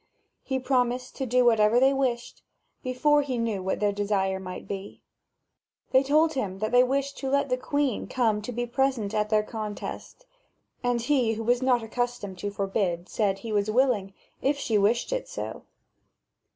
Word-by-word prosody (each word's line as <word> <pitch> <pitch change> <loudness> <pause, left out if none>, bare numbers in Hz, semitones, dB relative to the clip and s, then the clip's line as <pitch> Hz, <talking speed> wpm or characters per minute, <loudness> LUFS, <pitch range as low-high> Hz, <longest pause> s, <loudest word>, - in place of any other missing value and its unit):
He 265 - -1
promised 250 -1 0
to 265 - -2
do 250 +1 +3
whatever 225 0 +5
they 265 +2 +5
wished, 250 -3 -2 0.4
before 290 +4 +2
he 265 -3 -3
knew 225 -4 -1
what 190 +1 -2
their 205 -1 +2
desire 200 -2 0
might 185 -1 -7
be. 195 0 -6 0.9
Then 260 - +6
they 270 - -6
told 310 +3 +4
him 200 -9 -3
that 215 +3 -2
they 245 0 +6
wished 275 +2 -1
him 270 - -2
to - - -3
let 280 -1 0
the 255 - +1
Queen 280 -1 -1
come 225 -5 +1
to 215 - -5
be 240 0 -2
present 240 -4 0
at 210 0 0
their 215 -1 +3
contest. 215 - -6 0.6
And 245 -1 0
he 250 -4 +2
who 225 +1 -4
was 245 +2 +2
not 250 -3 +2
accustomed 225 -4 -3
to 205 - -2
forbid, 195 -3 -2
said 200 -3 0
he 220 +3 -7
was 205 0 +1
willing, 215 -5 +1 0.3
if 280 +1 +1
she 230 -5 -1
wished 220 - +2
ir - - -1
so. - - -6
240 Hz, 185 wpm, -27 LUFS, 210-260 Hz, 0.9 s, Then